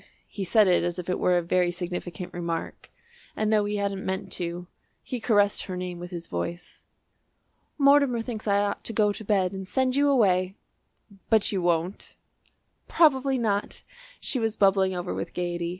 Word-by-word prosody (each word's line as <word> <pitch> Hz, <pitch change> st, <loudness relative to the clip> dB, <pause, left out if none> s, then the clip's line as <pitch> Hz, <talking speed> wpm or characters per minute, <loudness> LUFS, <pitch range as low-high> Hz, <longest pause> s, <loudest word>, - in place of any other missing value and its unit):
He 200 Hz, -, -5 dB
said 210 Hz, +2 st, +4 dB
it 180 Hz, -2 st, +3 dB
as 175 Hz, 0 st, -2 dB
if 180 Hz, 0 st, -4 dB
it -, -, -1 dB
were 180 Hz, -1 st, +3 dB
a 175 Hz, -, 0 dB
very 180 Hz, +1 st, +2 dB
significant 175 Hz, 0 st, -5 dB
remark, 170 Hz, -1 st, -5 dB, 0.5 s
and, 215 Hz, 0 st, 0 dB
though 210 Hz, -1 st, +3 dB
he 205 Hz, 0 st, -2 dB
hadn't 200 Hz, -1 st, -2 dB
meant 190 Hz, 0 st, -3 dB
to, 175 Hz, 0 st, -3 dB, 0.4 s
he 250 Hz, -, -5 dB
caressed 205 Hz, -3 st, +2 dB
her 185 Hz, -2 st, -5 dB
name 180 Hz, -1 st, -5 dB
with 175 Hz, 0 st, -7 dB
his 170 Hz, -2 st, -6 dB
voice. 170 Hz, -, -6 dB, 0.9 s
"Mortimer 280 Hz, -4 st, +4 dB
thinks 225 Hz, -3 st, -6 dB
I 200 Hz, 0 st, +3 dB
ought 205 Hz, -, -3 dB
to 230 Hz, -, -2 dB
go 210 Hz, -1 st, +2 dB
to 220 Hz, -, -8 dB
bed 195 Hz, -3 st, +1 dB
and 190 Hz, -1 st, -7 dB
send 260 Hz, +3 st, 0 dB
you 285 Hz, +1 st, +3 dB
away." 190 Hz, -7 st, +2 dB, 0.7 s
"But 220 Hz, -2 st, +4 dB
you 195 Hz, -3 st, -1 dB
won't?" 175 Hz, +2 st, -1 dB, 0.7 s
"Probably 270 Hz, -4 st, +3 dB
not." 210 Hz, -4 st, -2 dB, 0.4 s
She 260 Hz, -, -2 dB
was 225 Hz, -1 st, -1 dB
bubbling 195 Hz, -1 st, +3 dB
over 180 Hz, 0 st, -3 dB
with -, -, -5 dB
gaiety. 175 Hz, -1 st, -2 dB
195 Hz, 180 wpm, -26 LUFS, 175-220 Hz, 0.9 s, said